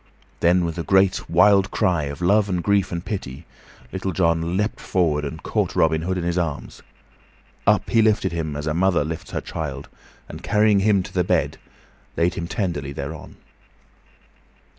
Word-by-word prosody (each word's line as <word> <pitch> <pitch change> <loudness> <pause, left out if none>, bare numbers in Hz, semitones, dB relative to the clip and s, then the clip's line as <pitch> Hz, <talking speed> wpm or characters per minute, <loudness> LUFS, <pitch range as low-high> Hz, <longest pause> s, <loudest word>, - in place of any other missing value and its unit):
Then, 90 +1 +3
with 85 +1 -4
a - - -2
great, 95 0 +2
wild 95 +4 +5
cry 90 -8 +1
of 70 +3 -7
love 100 +3 +3
and 90 -2 -1
grief 100 -1 +1
and 85 0 -4
pity, 80 -7 -5 0.5
Little 95 0 -3
John 85 0 +1
leaped 105 +2 -1
forward 80 -5 0
and 75 +2 -6
caught - - -1
Robin 80 0 +2
Hood 95 +3 -2
in 90 - -3
his 85 +1 0
arms. 75 -5 -4 0.9
Up - - +3
he 115 - +3
lifted 105 -4 +2
him 80 -3 -3
as 75 +1 -4
a 75 - -1
mother 90 -1 +2
lifts 80 +1 -6
her - - -3
child, 75 -4 -6 0.4
and - - -9
carrying 105 -1 +3
him 100 -1 +3
to - - -11
the 90 - +1
bed, - - 0 0.6
laid 85 +1 +2
him 85 -1 -4
tenderly 85 -10 -3
thereon. 70 +3 -7
85 Hz, 175 wpm, -22 LUFS, 80-95 Hz, 0.9 s, wild